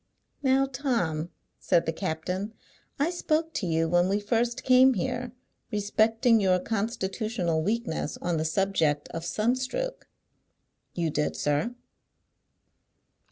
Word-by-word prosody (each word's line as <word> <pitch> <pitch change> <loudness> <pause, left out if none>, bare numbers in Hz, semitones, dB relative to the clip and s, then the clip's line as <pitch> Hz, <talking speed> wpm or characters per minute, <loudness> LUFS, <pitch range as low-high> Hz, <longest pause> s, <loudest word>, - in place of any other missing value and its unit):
"Now, 270 -1 +3
Tom," 235 - -1 0.3
said 175 -2 +2
the 160 - -1
captain, 185 +5 -3 0.4
"I 295 +5 +1
spoke 325 -2 0
to 190 - -2
you, 165 0 +1
when 175 +2 +3
we 200 +1 +1
first 235 +3 0
came 260 0 +6
here, 245 +3 -2 0.4
respecting 220 +3 +3
your 185 -2 +3
constitutional 200 -4 -1
weakness 210 -5 -2
on 175 -1 -1
the 155 - 0
subject 160 -4 +1
of 165 - -5
sun 215 +8 +1
stroke." - - -4 0.9
"You 165 -3 0
did, 150 0 -1
sir." 150 +12 0
205 Hz, 120 wpm, -27 LUFS, 170-245 Hz, 0.9 s, came